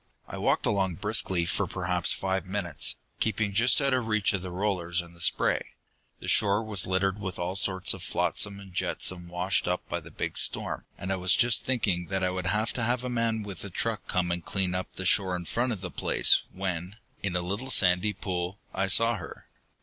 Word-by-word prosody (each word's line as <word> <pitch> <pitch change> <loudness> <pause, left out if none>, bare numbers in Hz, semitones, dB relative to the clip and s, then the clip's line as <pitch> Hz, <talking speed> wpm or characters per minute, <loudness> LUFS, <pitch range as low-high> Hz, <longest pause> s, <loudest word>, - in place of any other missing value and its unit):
"I - - -7
walked - - +1
along 95 -3 0
briskly 95 -3 +2
for - - 0
perhaps - - +1
five 95 -1 -2
minutes, 95 -6 0 0.2
keeping 110 -2 0
just 115 +5 +4
out 140 -2 +1
of 125 -3 0
reach 110 -2 +1
of 95 - -2
the 95 - -6
rollers 90 -2 0
and 85 -1 -6
the 85 - -14
spray. - - +1 0.4
The - - -9
shore 105 0 +4
was 105 -4 +1
littered 95 +1 0
with 95 -3 -5
all 90 +2 -3
sorts 95 -1 +3
of - - -9
flotsam 100 -1 +1
and 95 -2 -13
jetsam 90 0 +1
washed 90 +2 0
up 90 0 -2
by - - -3
the - - -13
big - - -3
storm, - - 0
and 95 - -4
I 95 - 0
was 90 -2 +4
just 120 -3 +2
thinking 100 -9 0
that 95 -1 -1
I 90 - +2
would 90 0 -3
have 110 +2 0
to 120 - -2
have 120 +2 0
a 125 - -3
man 115 -2 -1
with 100 -4 -8
a 100 - -5
truck 110 +3 -3
come 90 -1 0
and 85 -1 -2
clean 95 0 -1
up 90 0 -3
the 95 - -6
shore 95 0 +3
in 85 -1 -5
front 120 +7 -1
of 105 -6 -5
the 90 -2 -6
place, - - +3
when, 90 0 -4 0.3
in 95 -3 -2
a 90 - +1
little 100 +9 -3
sandy 95 -2 +3
pool, 90 0 -4 0.2
I 95 0 0
saw 115 +4 +4
her. 85 -4 -10
95 Hz, 220 wpm, -28 LUFS, 90-105 Hz, 0.4 s, just